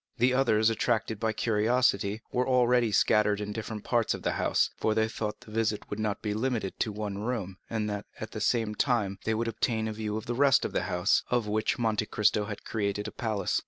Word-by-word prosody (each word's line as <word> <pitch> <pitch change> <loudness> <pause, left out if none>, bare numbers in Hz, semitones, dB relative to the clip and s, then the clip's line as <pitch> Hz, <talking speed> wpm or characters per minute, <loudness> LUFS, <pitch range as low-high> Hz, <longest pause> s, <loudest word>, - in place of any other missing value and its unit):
The 125 +1 +3
others, 115 -4 +3
attracted 110 -1 0
by 110 0 +1
curiosity, 110 -1 +1
were 125 0 0
already 125 -2 +3
scattered 105 0 +3
in 105 0 -4
different 110 -1 -5
parts 120 -2 +1
of - - -10
the - - +1
house; - - +1
for 110 - 0
they 110 0 +2
thought 110 -1 -4
the 120 -4 -13
visit 110 -1 -1
would 105 - -3
not 105 -1 -2
be 105 -1 -1
limited 110 -3 -2
to 110 - 0
the 105 - -9
one 100 -2 -3
room, 105 -5 -3
and 110 -2 -1
that, 105 -1 -4
at 110 - -6
the 110 - -5
same 110 0 +1
time, 105 -6 0
they 110 - +1
would 115 +1 -1
obtain 110 -1 -1
a 110 - -3
view 105 0 -3
of 110 - -6
the 120 - -2
rest 135 +2 +4
of - - -4
the - - +2
building, 90 0 -3 0.2
of 120 -2 +1
which 110 +1 0
Monte 110 -2 0
Cristo 105 0 +2
had 105 -1 -7
created 105 -1 -2
a - - -5
palace. 110 -4 -1
110 Hz, 230 wpm, -29 LUFS, 105-115 Hz, 0.2 s, rest